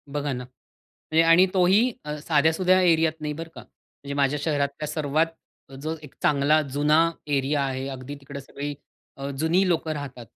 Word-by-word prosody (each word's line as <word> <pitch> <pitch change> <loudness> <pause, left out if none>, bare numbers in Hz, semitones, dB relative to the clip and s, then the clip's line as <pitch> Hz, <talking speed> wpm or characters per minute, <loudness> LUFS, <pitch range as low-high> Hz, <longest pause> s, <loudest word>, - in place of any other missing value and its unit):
बघा 145 0 -2
ना 125 0 -5 0.8
आणि 175 +3 +7
तोही 195 +7 +4
अ, 150 0 -3
साध्यासुध्या 160 +5 +3
एरियात 165 -3 +3
नाही 150 -1 -3
बरं 165 +2 -7
का. - - -8
म्हणजे 140 0 -12
माझ्या 140 +1 +1
शहरातल्या 145 -1 -1
सर्वात 155 +1 0 0.5
जो 160 +2 -3
एक 150 - -12
चांगला 150 +2 +3
जुना 150 +3 +3 0.2
एरिया 140 0 +1
आहे, 135 0 -3
अगदी 135 +1 -7
तिकडे 140 +1 -8
सगळी 145 +2 -6 0.4
अ, 135 0 -5
जुनी 170 +5 +2
लोकं 160 -2 0
राहतात. 135 -5 -7
150 Hz, 155 wpm, -25 LUFS, 140-160 Hz, 0.8 s, आणि